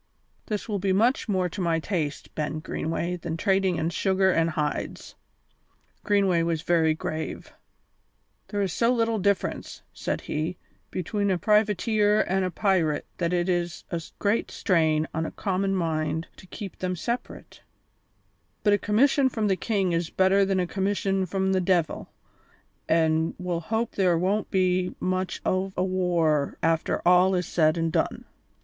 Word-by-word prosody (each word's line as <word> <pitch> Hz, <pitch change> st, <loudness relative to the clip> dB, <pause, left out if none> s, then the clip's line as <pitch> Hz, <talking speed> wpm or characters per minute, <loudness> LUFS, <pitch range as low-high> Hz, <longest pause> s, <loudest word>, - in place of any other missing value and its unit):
This 210 Hz, -3 st, -3 dB
will 205 Hz, -3 st, -2 dB
be 190 Hz, 0 st, +1 dB
much 230 Hz, +5 st, +2 dB
more 185 Hz, -3 st, +1 dB
to 190 Hz, -, -5 dB
my 165 Hz, -2 st, +1 dB
taste, 155 Hz, -4 st, -3 dB
Ben 155 Hz, 0 st, -2 dB
Greenway, 165 Hz, +3 st, -3 dB
than 165 Hz, -1 st, -4 dB
trading 190 Hz, -1 st, +2 dB
in 160 Hz, +1 st, -1 dB
sugar 190 Hz, +2 st, +2 dB
and 165 Hz, -1 st, +2 dB
hides." 150 Hz, -2 st, -3 dB, 0.9 s
Greenway 195 Hz, -5 st, +2 dB
was 165 Hz, -1 st, -1 dB
very 160 Hz, -3 st, +3 dB
grave. 155 Hz, 0 st, -5 dB, 0.9 s
"There 205 Hz, -1 st, -1 dB
is 185 Hz, -4 st, -2 dB
so 230 Hz, +7 st, +2 dB
little 230 Hz, -2 st, +1 dB
difference," 200 Hz, 0 st, -1 dB
said -, -, -3 dB
he, 160 Hz, +4 st, -3 dB, 0.3 s
"between 200 Hz, +3 st, -2 dB
a 185 Hz, -, +2 dB
privateer 210 Hz, +1 st, +2 dB
an' 190 Hz, +1 st, +1 dB
a 185 Hz, -, 0 dB
pirate 180 Hz, -6 st, +1 dB
that 170 Hz, -1 st, 0 dB
it 175 Hz, 0 st, +1 dB
is 175 Hz, -3 st, -1 dB
a 170 Hz, -2 st, -2 dB, 0.2 s
great 205 Hz, +3 st, 0 dB
strain 160 Hz, -5 st, +1 dB
on 160 Hz, +1 st, -1 dB
a -, -, -6 dB
common 195 Hz, 0 st, -1 dB
mind 160 Hz, -2 st, -1 dB
to 185 Hz, -, -14 dB
keep 200 Hz, 0 st, -8 dB
them 185 Hz, 0 st, -2 dB
separate; 235 Hz, +8 st, -5 dB, 1.0 s
but 205 Hz, -, +4 dB
a 205 Hz, -, +3 dB
commission 265 Hz, +5 st, +3 dB
from 220 Hz, -4 st, -1 dB
the 190 Hz, -, +3 dB
king 195 Hz, -2 st, 0 dB
is 170 Hz, 0 st, -1 dB
better 190 Hz, +1 st, +3 dB
than 195 Hz, -1 st, +1 dB
a 180 Hz, -, +1 dB
commission 195 Hz, 0 st, -1 dB
from 190 Hz, +1 st, 0 dB
the 185 Hz, -, +2 dB
de'il, 175 Hz, -3 st, 0 dB, 0.8 s
an' 160 Hz, 0 st, +2 dB
we'll 180 Hz, -2 st, -2 dB
hope 220 Hz, +7 st, -2 dB
there 180 Hz, -4 st, +2 dB
won't 195 Hz, +5 st, 0 dB
be 185 Hz, -1 st, +1 dB
much 185 Hz, 0 st, -2 dB
o' 190 Hz, +1 st, 0 dB
a 180 Hz, -, +2 dB
war 175 Hz, -6 st, +1 dB
after 165 Hz, +1 st, +1 dB
all 180 Hz, +1 st, +5 dB
is 180 Hz, -1 st, 0 dB
said 155 Hz, -1 st, +2 dB
an' 165 Hz, 0 st, 0 dB
done." -, -, -1 dB
185 Hz, 160 wpm, -26 LUFS, 165-200 Hz, 1.0 s, all